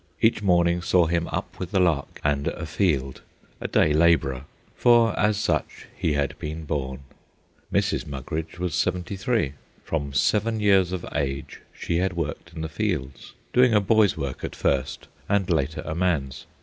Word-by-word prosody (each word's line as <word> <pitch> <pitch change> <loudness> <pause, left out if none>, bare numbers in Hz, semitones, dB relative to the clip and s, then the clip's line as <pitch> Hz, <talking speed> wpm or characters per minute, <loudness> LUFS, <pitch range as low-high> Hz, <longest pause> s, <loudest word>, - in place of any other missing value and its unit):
Each 110 -1 +3
morning 85 -3 +3
saw 90 -1 +3
him 85 +1 0
up - - -5
with 90 - -4
the 95 - +1
lark 85 -6 +1
and 70 -1 0
afield, 70 -9 -1 0.4
a - - -3
day 75 - +3
labourer, 75 -5 +3 0.3
for 120 -3 +5
as 105 0 +2
such 85 -8 -1
he 80 - 0
had 70 -2 -1
been 80 +1 -5
born. 70 -3 -3 0.7
Mrs. - - 0
Mugridge 75 +4 -5
was 90 -2 -2
seventy 90 +6 -1
three. 110 - 0 0.3
From 70 -3 -3
seven 105 - +1
years 95 -4 +4
of 95 -2 -4
age 70 -3 -3
she 85 - -2
had 95 +1 0
worked 80 -1 -4
in 80 - -5
the 80 - -2
fields, 80 -6 -3 0.2
doing 125 -2 +5
a - - +6
boy's 105 -2 +3
work 70 -4 -4
at - - -4
first, 65 -2 -1 0.2
and 100 -2 +2
later 80 -5 0
a - - -3
man's. 80 -7 -1
85 Hz, 165 wpm, -25 LUFS, 70-95 Hz, 0.7 s, a